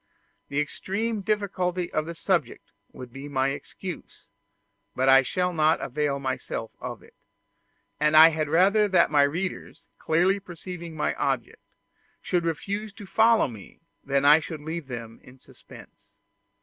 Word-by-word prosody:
The 140 - -1
extreme 205 +9 -2
difficulty 185 -4 -2
of 155 0 -1
the 170 - -6
subject 165 -7 -2 0.2
would 125 -2 -11
be 135 +2 -8
my 135 -1 +1
excuse, 150 +5 -8 0.7
but 130 +1 +1
I 135 0 +8
shall 180 +7 -1
not 155 0 +3
avail 140 +1 -1
myself 130 -4 -4
of 120 -3 -7
it; - - -19 0.9
and 150 +1 +3
I 160 +1 +10
had 155 -2 -2
rather 200 +6 +4
that 185 -5 +3
my 145 -1 +5
readers, 170 +7 -2 0.2
clearly 180 +5 +2
perceiving 175 -2 -9
my 150 - 0
object, - - -2 0.6
should 175 -2 -1
refuse 200 +6 -3
to 205 -1 -11
follow 220 +2 +4
me 110 -6 -12 0.2
than 140 0 0
that 140 - +6
I 155 - +7
should 155 -1 -7
leave 160 -1 -5
them 115 -3 -8
in 130 +1 -16
suspense. - - -17
160 Hz, 150 wpm, -26 LUFS, 140-185 Hz, 0.9 s, I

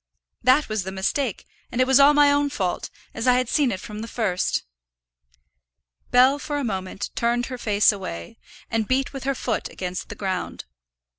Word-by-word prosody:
That 255 +5 +4
was 215 -1 -1
the 190 +1 -5
mistake, 195 +5 -2 0.3
and 240 - -3
it 255 - +5
was 265 +1 +5
all 285 +1 +7
my 290 -1 +6
own 285 0 +2
fault, 190 -10 -2 0.2
as 225 - -3
I 250 - +7
had 250 -1 +1
seen 275 0 +2
it 190 - -3
from 210 +1 -8
the 225 - -5
first." 210 -7 -1 1.5
Bell 260 +3 +5
for 290 0 -3
a 285 - -2
moment 190 -4 -4
turned 240 +1 0
her - - -4
face 210 -2 +4
away, 85 - -7 0.3
and 225 -2 0
beat 265 +2 0
with 270 -1 -6
her 275 0 0
foot 235 -3 -2
against 180 0 -5
the 210 - -6
ground. 190 -3 -4
235 Hz, 190 wpm, -24 LUFS, 195-270 Hz, 1.5 s, all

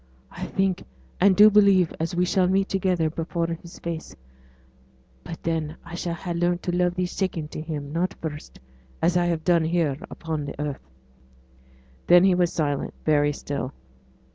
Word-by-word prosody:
I - - -6
think 195 -1 0 0.4
and 190 +1 +5
do 210 +2 +8
believe 200 -4 +5
as 165 +2 -2
we 180 +1 +2
shall 185 0 +2
meet 195 +1 +2
together 185 -4 +1
before 165 +2 -2
His 170 +1 -7
face; 170 -1 -6 1.1
but 165 - -8
then 160 -2 -2
I 170 - -10
shall 170 0 -3
ha' 175 +1 -4
learnt 175 +1 0
to 175 - -1
love 180 0 +1
thee 180 -1 0
second 175 -4 -3
to - - -5
Him; 150 -2 -5
not 175 +2 -1
first, 150 -2 -7 0.4
as 170 +2 +2
I 175 -1 +3
have 165 -2 -1
done 170 -2 +3
here 160 -4 +1
upon 160 -3 -4
the 140 - -7
earth.' 145 - -5 1.2
Then 175 +1 +7
he 190 -1 +5
was 175 -1 +2
silent 145 -3 -2
very 145 -1 +3
still. 140 -2 -4
170 Hz, 170 wpm, -25 LUFS, 155-180 Hz, 1.2 s, do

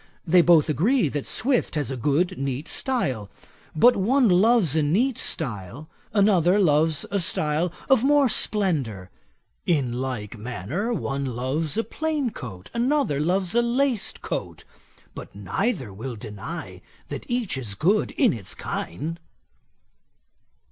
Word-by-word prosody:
They 175 +1 +6
both 170 -3 +5
agree 190 - +2
that 145 0 -4
Swift 250 -6 +1
has 145 -3 -1
a - - -2
good 145 +8 +1
neat 135 +3 -3
style; 130 - -2 0.5
but 245 +11 +6
one 245 +6 +3
loves 190 - +4
a 160 - +3
neat 220 - +1
style, 125 - -5 0.2
another 195 -3 +4
loves 155 -4 +2
a 200 - +1
style 160 0 0 0.2
of 265 -3 +4
more 285 0 +4
splendour. 145 - 0 0.6
In 140 -8 +1
like 120 -4 -4
manner, 125 - -3
one 140 -10 -2
loves 135 - -2
a 225 - +2
plain 305 -5 -2
coat, 95 - -9
another 245 - +1
loves 180 +3 0
a 240 - +4
laced 240 -1 0
coat; - - -4 0.5
but - - -10
neither 105 - -2
will 120 +5 -6
deny 105 -2 -8 0.3
that - - -7
each 240 - -1
is 115 -7 -5
good 195 - +2
in 245 - +4
its 100 -5 -6
kind.' 155 - -5
160 Hz, 135 wpm, -24 LUFS, -, 0.6 s, They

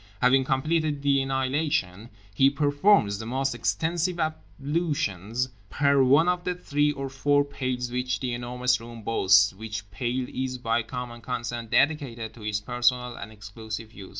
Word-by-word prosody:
Having 130 +1 +4
completed 150 +2 0
the 140 -1 +3
annihilation, 135 - -1 0.2
he 135 +6 +5
performs 145 - +3
the 110 - -6
most 135 +2 -1
extensive 165 - -1
ablutions 140 - -2 0.2
per 140 +1 +3
one 140 +6 +5
of 180 0 +1
the 180 0 -1
three 145 -4 +1
or 135 -1 -4
four 145 +2 +2
pails 130 -3 -3
which 125 0 -1
The 125 -2 -2
Enormous 125 +1 0
Room 115 -1 -10
boasts, 100 -2 +4
which 105 0 -7
pail 125 0 -2
is 130 0 -3
by 115 -1 0
common 120 0 -7
consent 120 -2 -4
dedicated 130 -6 +1
to 115 - -14
his 105 0 -1
personal 125 +1 0
and 110 - -8
exclusive 110 +1 -8
use. 95 -4 -10
125 Hz, 150 wpm, -26 LUFS, 115-140 Hz, 0.2 s, he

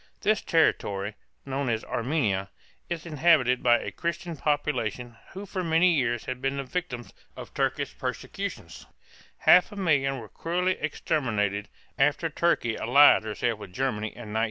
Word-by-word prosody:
This 215 +1 +2
territory, 105 - +1 0.3
known 135 -1 -2
as 110 -1 -1
Arme´nia, 115 -7 -1 0.4
is 170 -1 -4
inhabited 150 -5 +3
by 120 -1 +5
a - - -5
Christian 170 0 -4
population 130 -5 -2 0.2
who 195 +2 -7
for 185 -1 -4
many 165 +2 +4
years 120 -6 0
had 130 0 -5
been 135 +1 -1
the 140 - -2
victims 130 -4 -5 0.2
of - - -9
Turkish - - -1
persecutions; - - -5 0.5
half 180 +4 +5
a - - -9
million 140 -8 +1
were 115 -4 -8
cruelly 180 - -1
exterminated 110 - -1 0.3
after 145 +4 +2
Turkey 145 -9 +1
allied 140 +4 +6
herself 110 +1 -2
with 95 -3 -10
Germany 110 -2 -1
in 110 -1 -9
1914. - - -1
135 Hz, 150 wpm, -27 LUFS, 115-165 Hz, 0.5 s, allied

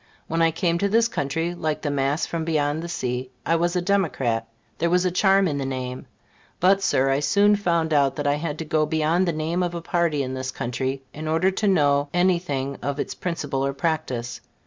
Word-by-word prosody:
When 165 +1 -1
I 165 - +5
came 170 +1 0
to 200 - +1
this 230 +2 +3
country, 165 -3 -2
like 155 -3 -3
the 145 - 0
mass 140 +2 0
from 165 -1 -3
beyond 155 -1 0
the 170 - -6
sea, 125 -4 -3 0.2
I 165 - +2
was 175 +2 0
a 180 - 0
Democrat; 140 - 0 0.3
there 170 - +1
was 180 +1 +2
a 180 - +2
charm 195 +1 +4
in 145 -3 -2
the - - -2
name. 130 -1 -5 0.5
But, 195 +2 +4
Sir, 135 -8 +2
I 135 - +2
soon 200 +8 +4
found 170 -5 0
that 145 0 +2
I 145 - +3
had 150 -1 -4
to 160 - -5
go 155 0 +1
beyond 160 +4 +1
the - - +2
name 160 +3 -1
of 175 -1 -1
a 170 - -4
party 165 -5 +1
in 130 0 -4
this 130 0 -4
country, 130 +2 -3
in 155 +1 -6
order 165 +4 +2
to 205 +2 -1
know 145 -6 +3
any 180 0 +3
thing 140 -5 -3
of 140 +2 -3
its - - -3
principles 145 -6 -3
or 140 - -2
practice. 135 -6 -2
160 Hz, 220 wpm, -24 LUFS, 140-175 Hz, 0.5 s, I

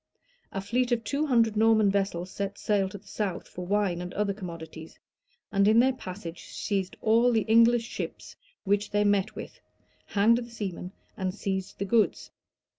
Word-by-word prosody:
A 195 - -3
fleet 245 +5 0
of 235 -1 +1
two 290 +6 -1
hundred 230 -5 +3
Norman 220 -2 +4
vessels 190 -2 -1
set 200 0 -4
sail 200 -2 +1
to 205 - -8
the 205 - -20
south 195 -5 -3
for 180 0 -8
wine 200 -3 +1
and 180 0 -6
other 205 -1 0
commodities; 165 -4 -9 0.5
and 200 -1 +3
in 215 +1 +5
their 260 +2 +4
passage 185 -7 -8
seized 195 -3 -3
all 230 +3 +4
the 225 -2 +3
English 230 +2 +4
ships - - -6 0.3
which 205 +1 +1
they 205 0 +2
met 205 -2 +1
with, - - -8 0.5
hanged 220 +4 +4
the 240 -1 -7
seamen, 190 -5 -5 0.2
and 185 0 -3
seized 190 -2 -3
the 200 - -2
goods. 220 +1 +1
205 Hz, 175 wpm, -28 LUFS, 190-225 Hz, 0.5 s, in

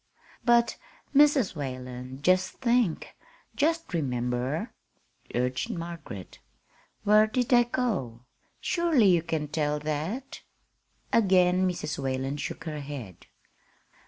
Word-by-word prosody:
"But, 235 0 +3 0.4
Mrs. 285 - +4
Whalen, 130 -1 -6
just 185 +2 +3
think 235 -8 0 0.4
just 325 - 0
remember," 125 -1 -1 0.6
urged 125 +1 -1
Margaret. 165 - -7 0.6
"Where 215 +1 +5
did 245 +2 -1
they 240 -1 +6
go? 190 - -2 0.4
Surely 335 - +2
you 175 -2 +4
can 160 -2 -2
tell 150 0 0
that." 155 - -4 0.7
Again 185 -3 +4
Mrs. 150 -4 -4
Whalen 135 +1 -2
shook 155 - -5
her 155 -2 -5
head. 135 - -8
165 Hz, 100 wpm, -28 LUFS, -, 0.7 s, they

